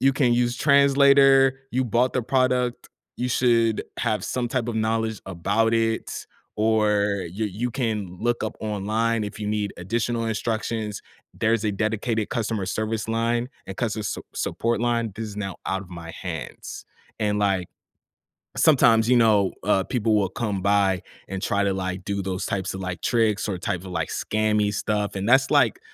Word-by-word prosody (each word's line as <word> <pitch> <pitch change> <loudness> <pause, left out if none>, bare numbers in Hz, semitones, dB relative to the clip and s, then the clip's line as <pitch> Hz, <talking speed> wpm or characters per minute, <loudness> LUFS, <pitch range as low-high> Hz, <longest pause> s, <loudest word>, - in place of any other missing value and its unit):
"You 135 0 +4
can 130 -3 +2
use 120 0 +1
translator. 140 -1 +5
You 130 +1 0
bought 120 +2 +1
the 125 - +1
product, 125 -1 0 0.3
you 125 - -2
should 115 -3 +2 0.2
have 105 -3 -1
some 125 -2 -2
type 120 -1 -1
of 115 - -2
knowledge 110 0 -1
about 100 +5 0
it, 115 0 -1 0.3
or 105 -2 +2
y 95 +6 -4
you 110 +5 -3
can 105 -8 -3
look 120 0 0
up 110 - -4
online 110 +2 0
if 105 - -7
you 105 - -3
need 105 -1 -1
additional 115 +5 -2
instructions. 110 -1 -2 0.3
There's 110 0 +1
a 105 - +2
dedicated 110 +2 -1
customer 110 -4 -1
service 110 +3 -2
line 115 +2 0 0.2
and 95 - -7
customer 110 -3 -2
s 95 - -3 0.2
support 115 0 -1
line. 120 -2 0
This 110 0 -4
is 105 - -9
now 95 -3 -4
out 95 0 -1
of 95 - -14
my 85 -2 -8
hands." 80 -5 -7 0.4
And, 105 -1 +1
like 95 -3 +1 0.9
sometimes, 120 -7 +5
you 125 - +5
know, 105 -4 +4
uh, 100 -1 +2
people 110 -1 0
will 100 -3 +2
come 100 -1 -3
by 100 -2 +2 0.3
and 95 0 -5
try 100 -1 +1
to, 100 -1 +1
like, 95 -1 -4
do 100 -1 -2
those 95 0 -3
types 95 -1 -2
of, 95 - -6
like, 90 -3 -5
tricks 110 -3 +1
or 95 - -2
type 90 0 -2
of, 95 - -10
like, 80 -3 -3
scammy 105 -1 0
stuff 105 -1 -1
and 100 +2 -2
that's, 135 +2 +5
like, - - +3
110 Hz, 175 wpm, -24 LUFS, 100-120 Hz, 0.9 s, translator